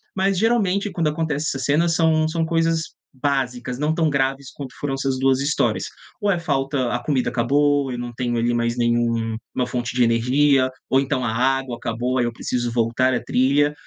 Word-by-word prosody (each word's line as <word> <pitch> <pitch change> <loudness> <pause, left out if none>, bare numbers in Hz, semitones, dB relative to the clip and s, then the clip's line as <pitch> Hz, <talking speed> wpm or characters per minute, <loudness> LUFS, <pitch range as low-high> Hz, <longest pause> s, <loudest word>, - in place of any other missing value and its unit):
Mas 195 -1 +1
geralmente 205 -2 +1
quando 165 -3 0
acontece 150 -1 -1
essas 135 -1 -2
cenas 160 +5 +2
são 160 -1 +3
são 165 +1 -1
coisas 165 0 0 0.2
básicas, 125 -2 -1
não 150 +1 0
tão 160 -2 +2
graves 135 -1 -1
quanto 130 -5 -8
foram 140 -2 -2
essas 135 -1 -1
2 135 0 +3
histórias, 145 +2 0 0.3
ou 205 - +1
é 180 - +2
falta 135 -5 -1
a 120 - -1
comida 130 -4 0
acabou, 140 +3 +2
eu 125 - -4
não 120 0 -5
tenho 120 0 -2
ali 120 +1 +1
mais 120 0 0
nenhum 120 -1 +1 0.2
uma 125 - +1
fonte 125 -1 -4
de 125 - +4
energia 130 +4 +3 0.2
ou 135 - +4
então 135 -2 -1
a 110 - -1
água 130 +1 0
acabou, 120 +3 -2
aí 120 - +2
eu 120 - -3
preciso 120 +1 -2
voltar 120 +2 +1
a - - -3
trilha, 140 +3 +2
135 Hz, 195 wpm, -22 LUFS, 120-150 Hz, 0.3 s, de